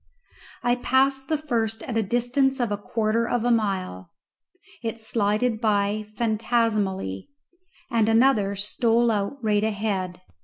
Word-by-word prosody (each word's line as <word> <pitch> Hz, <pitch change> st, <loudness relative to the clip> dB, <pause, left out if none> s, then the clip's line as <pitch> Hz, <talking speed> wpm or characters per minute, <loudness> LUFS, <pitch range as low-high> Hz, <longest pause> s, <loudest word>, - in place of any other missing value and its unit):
I 245 Hz, 0 st, +2 dB
passed 265 Hz, +2 st, +1 dB
the 310 Hz, -, +1 dB
first 230 Hz, -7 st, -2 dB
at 240 Hz, -, -5 dB
a 225 Hz, -, +3 dB
distance 245 Hz, +5 st, +1 dB
of 240 Hz, -4 st, 0 dB
a 205 Hz, -, 0 dB
quarter 225 Hz, +2 st, 0 dB
of 240 Hz, -1 st, 0 dB
a 245 Hz, -, +3 dB
mile; 190 Hz, -, -1 dB, 0.7 s
it 230 Hz, 0 st, -4 dB
slided 220 Hz, +1 st, 0 dB
by 210 Hz, 0 st, +1 dB
phantasmally, 215 Hz, -, 0 dB, 0.6 s
and 225 Hz, -2 st, +2 dB
another 225 Hz, -4 st, +3 dB
stole 230 Hz, +3 st, +1 dB
out 205 Hz, +5 st, -2 dB
right 210 Hz, -1 st, +2 dB
ahead. 200 Hz, -4 st, -2 dB
225 Hz, 130 wpm, -24 LUFS, 205-240 Hz, 0.7 s, a